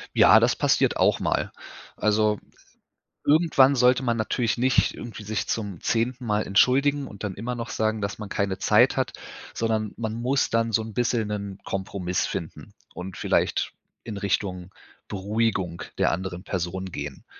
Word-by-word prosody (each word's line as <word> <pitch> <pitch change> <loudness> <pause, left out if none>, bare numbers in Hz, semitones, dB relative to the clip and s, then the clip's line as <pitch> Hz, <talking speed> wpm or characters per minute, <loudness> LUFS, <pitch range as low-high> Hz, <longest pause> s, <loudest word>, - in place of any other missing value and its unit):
Ja, - - +7
das - - +3
passiert - - +2
auch - - +3
mal. - - -1 0.4
Also, 105 0 +2 0.9
irgendwann 145 -3 +5
sollte 125 +1 +4
man 120 -2 +1
natürlich 115 +1 0
nicht 130 +2 +2
irgendwie 115 -3 -8
sich 105 0 -3
zum 100 -6 -3
10. 120 +2 -1
Mal 105 -1 +1
entschuldigen 135 +7 +3
und 100 - -11
dann 100 -2 -2
immernoch 115 +2 -4
sagen, 110 0 0
dass 100 +1 -3
man 105 -2 -6
keine 100 -2 -1
Zeit 115 +5 +4
hat. 130 -1 0 0.4
Sondern 110 -2 -1
man 110 -2 -3
muss 125 +4 0
dann 115 0 +1
so 110 +1 +2
'n 110 0 -7
bisschen 115 -1 0
'nen 100 -2 -5
Kompromiss 95 -2 -2
finden - - -6 0.2
und 90 0 -7
vielleicht - - 0 0.3
in 110 -3 -6
Richtung 95 -2 -2 0.4
Beruhigung 100 -3 -1 0.2
der - - +3
anderen 90 0 -4
Person 95 0 -3
gehen. 70 -7 -7
110 Hz, 155 wpm, -25 LUFS, 100-120 Hz, 0.9 s, Ja